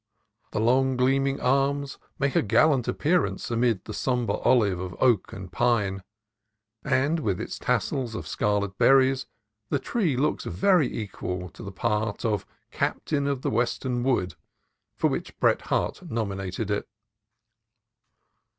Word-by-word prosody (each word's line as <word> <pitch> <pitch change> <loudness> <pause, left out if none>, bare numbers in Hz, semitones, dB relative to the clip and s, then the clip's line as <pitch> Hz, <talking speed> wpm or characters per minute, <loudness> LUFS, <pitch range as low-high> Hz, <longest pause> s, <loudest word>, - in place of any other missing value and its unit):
The 110 - -2
long, 130 +3 +3
gleaming 135 +2 +2
arms 140 +2 0 0.2
make 140 -1 0
a - - +5
gallant 125 +4 +3
appearance 160 -4 0
amid 115 -4 +1
the 110 - -6
sombre 125 -1 0
olive 105 -8 +3
of 90 -1 -5
oak 120 -7 +3
and 95 -2 -8
pine, 105 -3 +1 0.8
and 145 +6 +1
with 100 - -1
its - - -5
tassels 125 -5 -1
of - - -5
scarlet 100 -2 -1
berries 135 0 +4 0.4
the - - +1
tree 165 - -1
looks 150 +4 0
well 195 -3 +3
equal 95 -7 -4
to - - -14
the 100 - -7
part 105 +1 -1
of 105 -3 -1 0.2
"Captain 140 -2 -1
of 140 -2 -2
the - - 0
Western 120 +2 0
Wood," 120 -8 0 0.6
for - - +3
which - - -4
Bret - - +3
Harte - - -1
nomi 110 -4 -2
nated 95 +2 -4
it. 105 - -1
120 Hz, 140 wpm, -26 LUFS, 105-135 Hz, 0.8 s, a